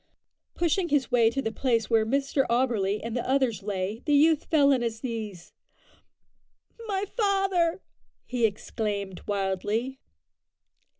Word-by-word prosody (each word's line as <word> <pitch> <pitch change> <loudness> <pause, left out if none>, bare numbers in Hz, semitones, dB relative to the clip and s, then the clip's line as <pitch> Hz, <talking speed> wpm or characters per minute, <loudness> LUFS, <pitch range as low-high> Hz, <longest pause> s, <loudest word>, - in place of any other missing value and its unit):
Pushing 345 +1 +1
his 280 -2 +1
way 235 -2 +5
to 270 +4 -3
the 225 - -1
place 230 -2 0
where 225 -2 +2
Mr 275 +2 +1
Auberly 230 -5 +1
and 230 0 -4
the 245 - -2
others 260 -6 +1
lay, 200 +2 -3
the 295 - +4
youth 310 +1 +4
fell 285 -3 +4
on 255 - +1
his 225 -1 -3
knees. 215 -8 -6 1.3
"My 395 -1 -1
father!" 390 -5 0 0.4
he 245 -3 +2
exclaimed 205 -2 -4
wildly. 205 +6 -2
240 Hz, 130 wpm, -27 LUFS, 215-285 Hz, 1.3 s, way